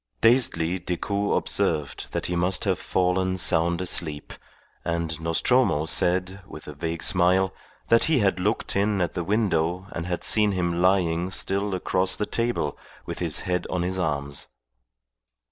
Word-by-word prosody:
Dazedly 95 Hz, -8 st, +3 dB
Decoud 100 Hz, +4 st, -1 dB
observed 75 Hz, -3 st, -1 dB
that -, -, -3 dB
he 90 Hz, -, -2 dB
must 90 Hz, +4 st, +1 dB
have 95 Hz, -4 st, 0 dB
fallen 95 Hz, 0 st, 0 dB
sound 85 Hz, 0 st, +2 dB
asleep, 80 Hz, -5 st, -2 dB, 0.5 s
and 85 Hz, -1 st, -3 dB
Nostromo 85 Hz, -, +2 dB
said, 90 Hz, +4 st, 0 dB
with 75 Hz, -, -11 dB
a 75 Hz, -, -7 dB
vague 80 Hz, +2 st, -4 dB
smile, 95 Hz, +1 st, +3 dB, 0.4 s
that 115 Hz, -, +5 dB
he 160 Hz, -, +2 dB
had 95 Hz, -6 st, +2 dB
looked 105 Hz, +5 st, -1 dB
in 100 Hz, 0 st, +1 dB
at 90 Hz, -3 st, -1 dB
the 90 Hz, -, -3 dB
window 90 Hz, -3 st, 0 dB
and 85 Hz, +1 st, -5 dB
had 90 Hz, -1 st, -3 dB
seen 105 Hz, -2 st, +3 dB
him 85 Hz, -2 st, -1 dB
lying 90 Hz, -2 st, +2 dB
still 100 Hz, +1 st, -1 dB
across 95 Hz, 0 st, +1 dB
the 105 Hz, -, -1 dB
table 115 Hz, -12 st, -1 dB, 0.3 s
with -, -, -6 dB
his -, -, -2 dB
head 90 Hz, 0 st, -2 dB
on 90 Hz, -1 st, -1 dB
his 95 Hz, +1 st, -1 dB
arms. 70 Hz, -4 st, -2 dB
90 Hz, 155 wpm, -25 LUFS, 85-95 Hz, 0.5 s, that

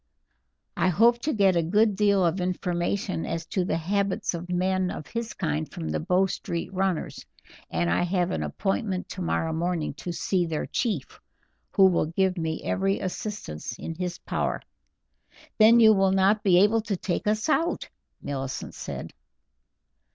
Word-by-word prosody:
I -, -, +2 dB
hope 230 Hz, +7 st, +4 dB
to 300 Hz, +6 st, -1 dB
get 195 Hz, -6 st, +3 dB
a 170 Hz, -, +3 dB
good 205 Hz, +5 st, +2 dB
deal 200 Hz, -2 st, +3 dB
of 170 Hz, +2 st, 0 dB
information 180 Hz, +1 st, -1 dB
as 165 Hz, 0 st, -3 dB
to 185 Hz, +2 st, -1 dB
the 165 Hz, -, 0 dB
habits 200 Hz, +4 st, -1 dB
of 175 Hz, +1 st, -6 dB
men 185 Hz, +1 st, +1 dB
of 155 Hz, -, -6 dB
his 230 Hz, +7 st, -5 dB
kind 75 Hz, +1 st, -2 dB
from 80 Hz, -, -5 dB
the 75 Hz, -, -1 dB
Bow 185 Hz, +3 st, +2 dB
Street 175 Hz, -1 st, -4 dB
runners, 190 Hz, -3 st, -1 dB, 0.5 s
and 85 Hz, +1 st, 0 dB
I 85 Hz, -, +2 dB
have 180 Hz, 0 st, 0 dB
an -, -, -2 dB
appointment 195 Hz, -2 st, -2 dB
tomorrow 170 Hz, -3 st, -1 dB
morning 170 Hz, -2 st, -1 dB
to 175 Hz, -, -5 dB
see 175 Hz, +1 st, 0 dB
their 155 Hz, -2 st, -2 dB
chief, 235 Hz, -4 st, -2 dB, 0.5 s
who 195 Hz, -, +6 dB
will 180 Hz, -4 st, +3 dB
give 185 Hz, +3 st, +1 dB
me 160 Hz, -2 st, -3 dB
every 195 Hz, +1 st, 0 dB
assistance 185 Hz, -, -5 dB
in 165 Hz, -, -5 dB
his 175 Hz, +1 st, -4 dB
power." -, -, -2 dB, 1.0 s
"Then 225 Hz, +2 st, +7 dB
you 220 Hz, -1 st, +8 dB
will 195 Hz, -1 st, +3 dB
not 195 Hz, +3 st, +3 dB
be 185 Hz, -3 st, +4 dB
able 220 Hz, +2 st, +3 dB
to 210 Hz, -3 st, -3 dB
take 185 Hz, +2 st, -2 dB
us 215 Hz, 0 st, +1 dB
out?" 330 Hz, +2 st, +1 dB, 0.4 s
Millicent 135 Hz, -2 st, -4 dB
said. -, -, -7 dB
185 Hz, 165 wpm, -26 LUFS, 170-200 Hz, 1.0 s, you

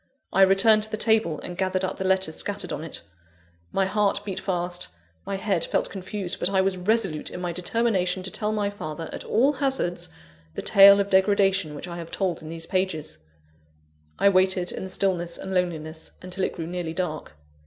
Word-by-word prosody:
I 195 Hz, -, +4 dB
returned 195 Hz, +3 st, +6 dB
to 215 Hz, -, -1 dB
the 215 Hz, -, -3 dB
table, 220 Hz, -8 st, +2 dB
and 175 Hz, -, -6 dB
gathered 185 Hz, 0 st, -1 dB
up -, -, -4 dB
the -, -, -3 dB
letters 190 Hz, -4 st, +1 dB
scattered 200 Hz, -3 st, -3 dB
on 150 Hz, -, -4 dB
it. 160 Hz, -, -7 dB, 0.7 s
My 195 Hz, -, +1 dB
heart 205 Hz, +1 st, 0 dB
beat 195 Hz, -3 st, -4 dB
fast, 175 Hz, -1 st, -2 dB, 0.4 s
my 195 Hz, -, -2 dB
head 195 Hz, -4 st, 0 dB
felt -, -, -1 dB
confused; 190 Hz, -1 st, -5 dB
but -, -, +1 dB
I 195 Hz, -1 st, +2 dB
was 190 Hz, 0 st, +2 dB
resolute 185 Hz, -4 st, 0 dB
in -, -, -7 dB
my 175 Hz, -1 st, -2 dB
determination 185 Hz, 0 st, 0 dB
to 190 Hz, -, -6 dB
tell 210 Hz, +3 st, -1 dB
my 205 Hz, -1 st, -1 dB
father, 160 Hz, -4 st, -6 dB
at -, -, -5 dB
all 265 Hz, +7 st, +3 dB
hazards, 260 Hz, -11 st, -1 dB, 0.5 s
the -, -, -4 dB
tale 200 Hz, 0 st, +8 dB
of 200 Hz, 0 st, -1 dB
degradation 195 Hz, -4 st, +3 dB
which 145 Hz, -, -7 dB
I 175 Hz, 0 st, -6 dB
have 165 Hz, -1 st, -7 dB
told 185 Hz, -4 st, -2 dB
in 155 Hz, -, -9 dB
these 165 Hz, 0 st, -6 dB
pages. 185 Hz, -, -2 dB, 1.0 s
I -, -, +4 dB
waited 185 Hz, -1 st, +2 dB
in -, -, -5 dB
the 190 Hz, -, -6 dB
stillness 180 Hz, -3 st, 0 dB
and 190 Hz, -, -6 dB
loneliness, 160 Hz, -3 st, -2 dB
until 185 Hz, +1 st, -2 dB
it -, -, -3 dB
grew 165 Hz, -, -4 dB
nearly 170 Hz, -1 st, -4 dB
dark. 155 Hz, -, -4 dB
185 Hz, 195 wpm, -25 LUFS, 175-200 Hz, 1.0 s, tale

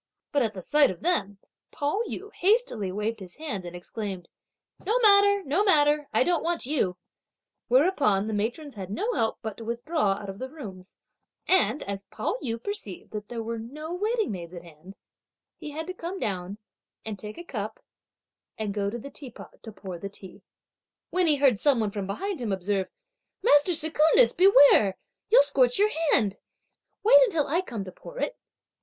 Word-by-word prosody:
But 285 Hz, -, +2 dB
at 220 Hz, -4 st, -1 dB
the 185 Hz, -, -7 dB
sight 295 Hz, -, +4 dB
of 185 Hz, -, -7 dB
them, 205 Hz, -, 0 dB, 0.3 s
Pao 295 Hz, +9 st, -1 dB
yü 410 Hz, +3 st, -7 dB
hastily 370 Hz, -, +1 dB
waved 215 Hz, +3 st, -3 dB
his 180 Hz, -2 st, -10 dB
hand 275 Hz, -, -5 dB
and 175 Hz, 0 st, -8 dB
exclaimed: 185 Hz, 0 st, -6 dB, 0.5 s
"No 435 Hz, +6 st, +1 dB
matter, 405 Hz, -3 st, +6 dB
no 330 Hz, +7 st, +1 dB
matter; 295 Hz, -6 st, +3 dB
I -, -, +3 dB
don't 345 Hz, -2 st, +1 dB
want 335 Hz, -4 st, -1 dB
you," 245 Hz, -10 st, 0 dB, 0.7 s
whereupon 255 Hz, -, +3 dB
the 220 Hz, -, -3 dB
matrons 240 Hz, +8 st, -3 dB
had 190 Hz, -3 st, -7 dB
no 430 Hz, -, -2 dB
help 225 Hz, -, 0 dB
but 220 Hz, -2 st, -5 dB
to 230 Hz, -, -8 dB
withdraw 235 Hz, 0 st, 0 dB
out 200 Hz, +1 st, -8 dB
of 195 Hz, +1 st, -7 dB
the 260 Hz, -, -5 dB
rooms; 195 Hz, -11 st, -10 dB, 0.5 s
and 275 Hz, -, +3 dB
as 200 Hz, 0 st, -6 dB
Pao 215 Hz, +5 st, -3 dB
yü 230 Hz, -3 st, -3 dB
perceived 405 Hz, -, -6 dB
that 210 Hz, -1 st, -6 dB
there 230 Hz, -2 st, -4 dB
were 230 Hz, 0 st, -4 dB
no 305 Hz, +9 st, -7 dB
waiting 430 Hz, -, -1 dB
maids 175 Hz, -2 st, -7 dB
at 175 Hz, -, -9 dB
hand, 170 Hz, +3 st, -14 dB, 0.6 s
he 305 Hz, -, -7 dB
had 315 Hz, +2 st, -5 dB
to 370 Hz, -, -5 dB
come 355 Hz, +2 st, -6 dB
down 190 Hz, -, -3 dB, 0.5 s
and 215 Hz, -3 st, -5 dB
take 210 Hz, +1 st, -8 dB
a 345 Hz, -, -7 dB
cup 220 Hz, -9 st, -5 dB, 0.8 s
and 215 Hz, -2 st, -3 dB
go 200 Hz, -1 st, -1 dB
up 200 Hz, -, -3 dB
to -, -, -3 dB
the 280 Hz, +4 st, -9 dB
teapot 260 Hz, -5 st, -11 dB
to 220 Hz, -, -9 dB
pour 190 Hz, -3 st, -8 dB
the 200 Hz, -, -6 dB
tea; 195 Hz, 0 st, -13 dB, 0.7 s
when 365 Hz, -1 st, +2 dB
he 305 Hz, -, +5 dB
heard 270 Hz, -7 st, +3 dB
some 280 Hz, -5 st, +3 dB
one 215 Hz, -2 st, 0 dB
from 200 Hz, -2 st, -4 dB
behind 375 Hz, -, -4 dB
him 225 Hz, -4 st, -2 dB
observe: 190 Hz, 0 st, -1 dB, 0.5 s
"Master 290 Hz, +5 st, +5 dB
Secundus, 320 Hz, +8 st, +4 dB
beware, 285 Hz, -, +6 dB, 0.3 s
you'll 460 Hz, -, +7 dB
scorch 265 Hz, -4 st, +2 dB
your 415 Hz, +2 st, +3 dB, 0.2 s
hand; 205 Hz, -5 st, +2 dB, 0.7 s
wait -, -, +8 dB
until 330 Hz, -, +1 dB
I 335 Hz, +6 st, +1 dB
come 230 Hz, -, -6 dB
to 185 Hz, -, -8 dB
pour -, -, -12 dB
it!" -, -, -2 dB
240 Hz, 185 wpm, -26 LUFS, 200-330 Hz, 0.8 s, wait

